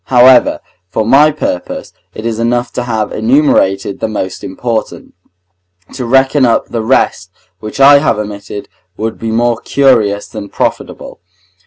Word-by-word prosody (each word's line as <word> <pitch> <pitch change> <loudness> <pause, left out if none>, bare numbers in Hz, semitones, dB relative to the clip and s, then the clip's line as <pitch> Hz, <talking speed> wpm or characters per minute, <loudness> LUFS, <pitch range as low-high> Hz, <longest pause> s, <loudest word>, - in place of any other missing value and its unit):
However, 125 0 +4 0.3
for 110 +3 -1
my 140 +6 +5
purpose, 115 -11 -5 0.2
it 110 - -7
is 115 -1 -2
enough 120 +1 -1
to 125 - -3
have 110 -3 -2
enumerated 110 -6 +1
the 110 - -2
most 95 -4 -5
important; 110 +3 -4 0.8
to 130 - -5
reckon 135 +2 +3
up 115 -2 +2
the 115 - -3
rest 110 -6 0 0.3
which 110 +4 -8
I 140 +1 +7
have 140 - 0
omitted 105 -1 -7 0.3
would 110 +1 -4
be 115 - -4
more 115 +1 0
curious 115 -7 +2
than 105 -2 -8
profitable. - - -4
115 Hz, 145 wpm, -13 LUFS, 105-130 Hz, 0.8 s, I